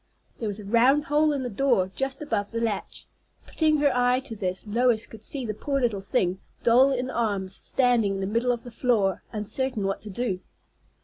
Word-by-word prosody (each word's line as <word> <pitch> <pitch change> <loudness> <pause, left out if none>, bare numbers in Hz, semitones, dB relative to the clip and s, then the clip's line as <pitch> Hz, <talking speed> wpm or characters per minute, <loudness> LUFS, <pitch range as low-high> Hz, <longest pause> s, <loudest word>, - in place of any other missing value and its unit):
There 225 - -2
was 205 0 -4
a 210 - -9
round 245 +7 +4
hole 300 0 +2
in 280 -3 -2
the 250 - -3
door 205 -5 +1
just 270 +2 -2
above 210 -8 -2
the 230 - -3
latch. 225 -3 -3 0.4
Putting 310 -1 +2
her 285 -3 +2
eye 250 0 +3
to 235 -4 -8
this, 185 -1 -3
Lois 230 +1 +2
could 225 - -13
see 260 +3 -1
the 215 - -2
poor 275 +6 -2
little 230 -6 0
thing, 190 -3 0 0.2
doll 255 +4 +5
in 255 0 -2
arms, 200 -5 -1
standing 240 -6 +1
in - - -4
the 195 - -1
middle 230 +5 +1
of 240 -1 -3
the 245 - -10
floor, 225 -6 +1
uncertain 220 +2 -2
what 195 0 -2
to 215 - -8
do. 200 -2 -2
235 Hz, 205 wpm, -26 LUFS, 205-260 Hz, 0.4 s, doll